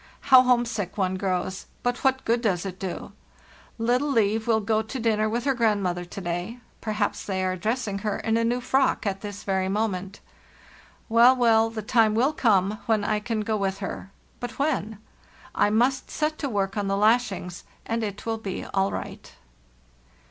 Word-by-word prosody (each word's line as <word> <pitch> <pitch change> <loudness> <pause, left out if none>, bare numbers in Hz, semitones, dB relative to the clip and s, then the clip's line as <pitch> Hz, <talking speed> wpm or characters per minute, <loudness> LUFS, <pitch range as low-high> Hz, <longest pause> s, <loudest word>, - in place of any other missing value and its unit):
How 255 - +11
homesick 240 -7 0
one 190 -2 +1
grows; 185 0 -2 0.2
but 245 0 0
what 265 -1 +1
good 230 +1 +2
does 195 -6 0
it 185 -1 -6
do? 190 -3 -5 0.7
Little 245 +5 +1
Liv 220 -3 +1
will 225 -1 +3
go 220 +1 +1
to 260 +4 -6
dinner 215 -2 +1
with 235 +2 -2
her 275 - +2
grandmother 200 -7 0
to 175 - -8
day—perhaps 210 +4 -3
they 190 -2 -2
are 185 0 0
dressing 215 +1 -2
her 210 0 -2
in 225 - -1
a 230 - +2
new 240 +2 0
frock 265 0 +1
at 195 -1 -2
this 205 -1 -7
very 190 -1 0
moment! 195 -2 -2 0.9
Well, 235 +3 +6
well, 225 -2 +4
the 225 -1 -6
time 220 -1 +3
will 260 +7 +2
come 210 -5 +2
when 220 -2 +2
I 210 0 0
can 215 0 -2
go 215 +1 -1
with 195 -1 -1
her; 195 -1 -6 0.3
but 245 - -6
when? 275 -7 -1 0.3
[ - - -23 0.2
must 250 +5 +1
set 310 0 -2
to 280 - -2
work 200 -2 -1
on 205 -2 -1
the 195 0 0
lashings, 210 -4 +1 0.2
and 230 0 -2
it 205 -1 -5
will 225 -1 -2
be 195 -4 -5
all 195 0 0
nght." - - -7
215 Hz, 180 wpm, -25 LUFS, 195-235 Hz, 0.9 s, How